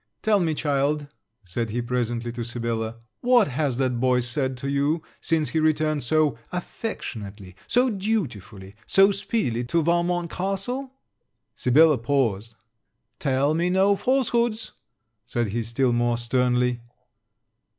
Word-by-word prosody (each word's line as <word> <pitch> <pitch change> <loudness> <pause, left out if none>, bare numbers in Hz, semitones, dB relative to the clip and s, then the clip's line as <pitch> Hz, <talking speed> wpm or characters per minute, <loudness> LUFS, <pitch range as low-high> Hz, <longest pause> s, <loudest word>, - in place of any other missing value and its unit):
'Tell 215 -2 +3
me, 165 -4 0
child,' 145 0 0 0.4
said 110 +5 -3
he 115 +3 -2
presently, 120 -1 -2
to 120 0 -5
Sibella, 115 -1 -3 0.2
'what 245 - +4
has 135 -2 -1
that 130 -2 0
boy 125 0 +3
said 130 +2 -1
to 135 - -5
you, 140 +3 0 0.2
since 160 -2 0
he 160 - 0
returned 155 -1 +1
so 150 0 +1
affectionately, 105 - -6
so 250 +1 +3
dutifully, 130 - -3
so 195 +1 +5
speedily, 125 - -1
to 165 +7 +1
Valmont 170 +1 +1
castle?' 195 +9 -3 0.6
Sibella 150 +2 +4
paused: 115 -4 0 0.6
'Tell 140 +2 +1
me 170 +2 +1
no 190 +2 +4
falsehoods,' 235 -2 0 0.6
said 120 -3 -1
he 115 +4 -2
still 120 +3 0
more 120 0 +1
sternly. 125 0 +1
140 Hz, 130 wpm, -24 LUFS, 120-175 Hz, 0.6 s, so